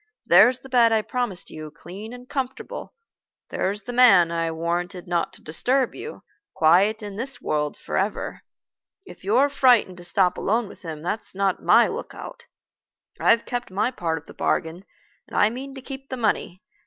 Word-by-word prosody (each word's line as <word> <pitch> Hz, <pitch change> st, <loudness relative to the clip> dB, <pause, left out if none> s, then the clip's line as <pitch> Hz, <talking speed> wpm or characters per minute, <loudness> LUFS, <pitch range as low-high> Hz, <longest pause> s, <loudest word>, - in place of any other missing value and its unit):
There's 250 Hz, +1 st, +6 dB
the -, -, -12 dB
bed 240 Hz, -3 st, +4 dB
I 220 Hz, -1 st, +2 dB
promised 225 Hz, -4 st, -2 dB
you, 155 Hz, -1 st, -8 dB
clean 185 Hz, +8 st, -10 dB
and 250 Hz, 0 st, -11 dB
comfortable. 265 Hz, -, -5 dB, 0.6 s
There's 205 Hz, +3 st, -2 dB
the 245 Hz, -, -6 dB
man 200 Hz, -9 st, +6 dB
I 165 Hz, -1 st, -1 dB
warranted 175 Hz, +3 st, -3 dB
not 175 Hz, -1 st, 0 dB
to -, -, -15 dB
disturb 250 Hz, -, 0 dB
you, 460 Hz, -, -9 dB, 0.3 s
quiet 195 Hz, +8 st, +4 dB
in 205 Hz, -1 st, -7 dB
this 265 Hz, +4 st, -3 dB
world 150 Hz, -1 st, -2 dB
forever. 195 Hz, +2 st, -3 dB, 0.6 s
If -, -, -13 dB
you're 235 Hz, +9 st, +3 dB
frightened 245 Hz, -9 st, +3 dB
to 175 Hz, -, -10 dB
stop 180 Hz, +1 st, +1 dB
alone 225 Hz, +2 st, 0 dB
with -, -, -14 dB
him, 160 Hz, -3 st, -7 dB
that's 200 Hz, +3 st, -1 dB
not 195 Hz, -1 st, 0 dB
my -, -, +5 dB
lookout. -, -, -8 dB, 0.7 s
I've 230 Hz, 0 st, +3 dB
kept 245 Hz, 0 st, -4 dB
my 205 Hz, +6 st, 0 dB
part 165 Hz, -9 st, -2 dB
of 155 Hz, -, -10 dB
the -, -, -12 dB
bargain, 170 Hz, +3 st, -2 dB, 0.4 s
and -, -, -6 dB
I 215 Hz, -, +4 dB
mean 270 Hz, +3 st, -7 dB
to 265 Hz, -, -8 dB
keep 270 Hz, 0 st, -8 dB
the 260 Hz, -, -4 dB
money. 210 Hz, -5 st, -1 dB
205 Hz, 175 wpm, -24 LUFS, 175-245 Hz, 0.7 s, There's